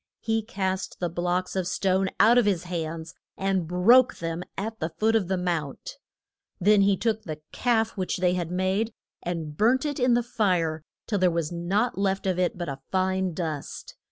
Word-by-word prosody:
He 225 0 0
cast 190 -3 -3
the 175 - -1
blocks 180 +2 -1
of 185 -2 -1
stone 190 +1 +1
out 235 +3 +7
of 230 - +2
his 185 -4 +1
hands 165 -2 -4 0.2
and 190 -3 0
broke 230 +9 +5
them 165 0 -4 0.2
at 220 +2 -4
the 160 - -2
foot 220 +6 +1
of 205 -5 +2
the 190 0 0
mount. 170 -6 -3 0.6
Then 205 +2 +5
he 195 0 +3
took 220 0 0
the 155 -6 -6
calf 225 -3 +1
which 185 -3 -2
they 180 -1 +2
had 175 -2 -2
made, 190 +5 0 0.3
and 165 -4 -4
burnt 240 - +3
it 290 -2 -2
in 250 -1 +4
the 240 - +2
fire 180 -9 0 0.2
till 205 -3 -1
there 185 0 +4
was 170 -2 -2
nought 190 +6 0
left 195 -1 0
of 185 -2 0
it 180 0 0
but 175 - -4
a 135 -1 -5
fine 185 -2 0
dust. 155 -5 -5
185 Hz, 190 wpm, -26 LUFS, 175-215 Hz, 0.6 s, out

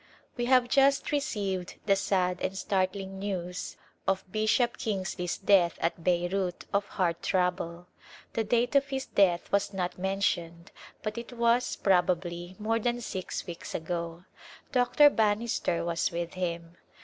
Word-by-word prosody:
We 240 - -1
have 255 -1 +4
just 275 +2 +3
received 205 -11 -2
the 200 -2 +4
sad 180 -2 0
and 190 +1 -2
startling 190 0 -1
news 180 -2 -4 0.3
of 195 -1 +1
Bishop 215 +3 +2
Kingsley's 185 -4 -2
death 190 -4 +4
at 165 0 -1
Beirut 180 +1 0
of 200 0 +1
heart 170 -4 -1
trouble. 180 -2 -1 0.5
The 225 - 0
date 240 +4 +1
of 280 0 +4
his 270 -1 -3
death 180 -4 +2
was 200 0 +1
not 180 -1 -2
mentioned 175 -3 -1 0.3
but 215 +1 -3
it 235 +1 -9
was, 235 +1 +2
probably, 175 -1 +1
more 225 +2 0
than 240 +1 0
six 190 -5 -4
weeks 170 -1 -7
ago. 170 +1 -4 0.5
Dr. 275 +3 +5
Bannister 210 -6 +1
was 170 -1 0
with 170 0 -3
him. 170 -2 -4
190 Hz, 140 wpm, -29 LUFS, 175-225 Hz, 0.5 s, Dr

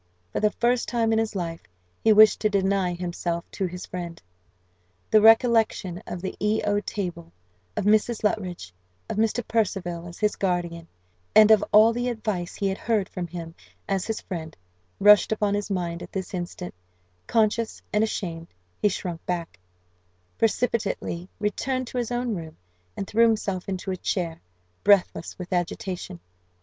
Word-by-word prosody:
For - - -1
the 210 - +3
first 240 +3 0
time 230 -2 +1
in 220 - +3
his 220 -1 -2
life, 165 -3 -3 0.4
he 220 - +5
wished 215 0 +7
to 215 - +2
deny 195 -2 +1
himself 175 -1 -3
to 190 - -2
his 180 +1 -7
friend. 175 -2 -6 0.9
The 215 - +6
recollection 225 -5 +4
of 180 0 -6
the 190 - -3
E 210 +2 +1
O 205 0 +2
table, 175 -5 -5 0.5
of - - -1
Mrs. 215 +2 +2
Luttridge, 185 - -2 0.3
of - - -4
Mr. 225 +1 0
Percival 180 -6 -1
as 170 - -10
his 210 -1 +1
guardian, 175 -3 -1 0.5
and 215 0 +8
of 215 -2 +6
all 220 +2 +7
the 245 +1 -1
advice 215 -7 -3
he 200 - -1
had 190 0 -2
heard 215 -4 0
from 180 -1 -4
him 165 -1 -7 0.3
as 195 -2 -1
his 220 -1 -2
friend, 160 -4 -6 0.4
rushed 210 +1 +7
upon 210 -2 +1
his 205 0 -2
mind 175 -3 -2
at - - -9
this 190 -1 -5
instant; 180 0 -5 0.5
conscious 225 0 +1
and 210 +1 +3
ashamed, 170 -6 -3 0.3
he 210 - +4
shrunk 175 -3 -4
back, 170 - -3 0.8
precipitately 215 -6 0
returned 255 +5 -1
to 250 +1 -4
his 240 - -2
own 240 -1 -1
room, 165 -4 -7 0.4
and - - -2
threw 230 +4 +4
himself 200 -4 -1
into 190 0 -3
a 185 - -3
chair, 170 -2 -2 0.4
breathless 195 -4 +3
with 180 0 -6
agitation. 180 0 -3
195 Hz, 160 wpm, -25 LUFS, 175-220 Hz, 0.9 s, and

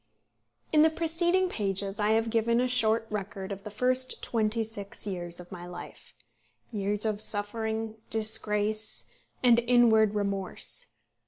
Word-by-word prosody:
In 305 - +6
the 320 - +6
preceding 345 +3 +1
pages 200 - -2
I 210 +1 +2
have 225 0 +1
given 230 +1 +2
a 250 - +2
short 225 -3 +1
record 200 -1 -5
of 195 0 -6
the 210 - -6
first 255 +4 0
twenty 225 0 0
six 205 -3 -6
years 175 -3 -3
of 180 0 -12
my 175 -1 -8
life, 175 0 -11 0.6
years 205 0 -2
of 215 -1 0
suffering, 220 +1 -3
disgrace, 215 -1 +3 0.4
and 240 -2 +6
inward 230 -3 +4
remorse. 200 - -3
220 Hz, 140 wpm, -28 LUFS, 200-235 Hz, 0.6 s, In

